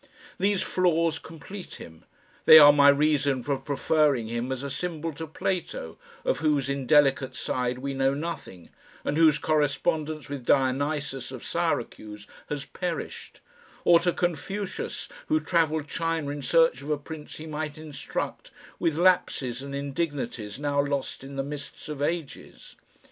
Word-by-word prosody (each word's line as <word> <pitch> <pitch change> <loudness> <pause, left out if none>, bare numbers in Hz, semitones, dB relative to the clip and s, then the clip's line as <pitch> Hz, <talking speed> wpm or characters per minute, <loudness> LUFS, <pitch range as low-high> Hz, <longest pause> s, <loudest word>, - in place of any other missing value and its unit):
These 200 0 +2
flaws 165 -3 +1
complete 170 +6 -10
him. 80 -1 -12 0.4
They 155 - +11
are 145 -1 +10
my 145 0 +7
reason 140 -2 +2
for 140 0 -1
preferring 145 -4 +1
him 120 +2 -2
as 130 0 -3
a 140 - -3
symbol 165 +2 -3
to 160 +3 -6
Plato, 190 - -3 0.3
of - - +1
whose 145 -3 +1
indelicate 135 -1 +3
side 125 -1 -1
we 135 +2 -4
know 135 0 +1
nothing, 145 - -6 0.3
and - - 0
whose 155 -2 +5
correspondence 155 0 0
with 140 -3 -6
Dionysius 135 0 0
of - - -8
Syracuse 105 -1 -2 0.2
has 145 -2 -3
perished; 175 +1 -5 0.4
or 170 -1 +7
to 175 +1 +1
Confucius 180 +4 -3 0.2
who 310 - +3
travelled 160 - +1
China 165 -2 -2
in 145 0 -5
search 165 -2 +3
of 140 - -8
a 150 - +1
Prince 150 +1 -9
he 155 - -8
might 155 -1 -4
instruct, 155 -2 -5 0.3
with 160 -2 0
lapses 145 -8 +2
and 140 0 -6
indignities 140 -7 -3
now 145 0 +1
lost 140 -2 -3
in 135 +1 -9
the 135 - -1
mists 145 +2 -8
of 150 -2 -5
ages. 160 -1 -4
145 Hz, 150 wpm, -27 LUFS, 135-165 Hz, 0.4 s, They